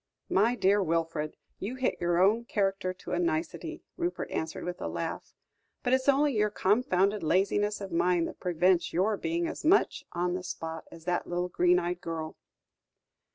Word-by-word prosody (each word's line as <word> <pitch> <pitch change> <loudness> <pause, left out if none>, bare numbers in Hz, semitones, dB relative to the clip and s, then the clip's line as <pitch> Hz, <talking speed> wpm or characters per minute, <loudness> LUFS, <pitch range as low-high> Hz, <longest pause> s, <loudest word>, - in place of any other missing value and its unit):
"My 220 +6 +3
dear 200 -2 +3
Wilfred, 165 -3 -1 0.2
you 225 +6 -4
hit 260 0 0
your 175 0 +2
own 215 +5 +4
character 195 -4 0
to 185 - -9
a - - 0
nicety," 330 -1 -2
Rupert 350 0 -2
answered 160 0 -3
with 180 0 -5
a - - -2
laugh; - - -5 0.5
"but 250 -1 +1
it's 260 +1 +3
only 280 -1 +3
your 210 0 +3
confounded 205 -1 +2
laziness 200 +5 +1
of 195 -2 -6
mind 170 0 +2
that - - -9
prevents 180 0 +2
your 195 +5 +2
being 335 - -1
as 325 - -5
much 365 +6 +3
on 175 0 -1
the 180 - -2
spot 160 -2 -5
as 165 -1 -12
that 180 0 -1
little 175 +1 -1
green 180 0 +3
eyed 175 0 -2
girl." 160 -1 -4
185 Hz, 175 wpm, -29 LUFS, 175-230 Hz, 0.5 s, own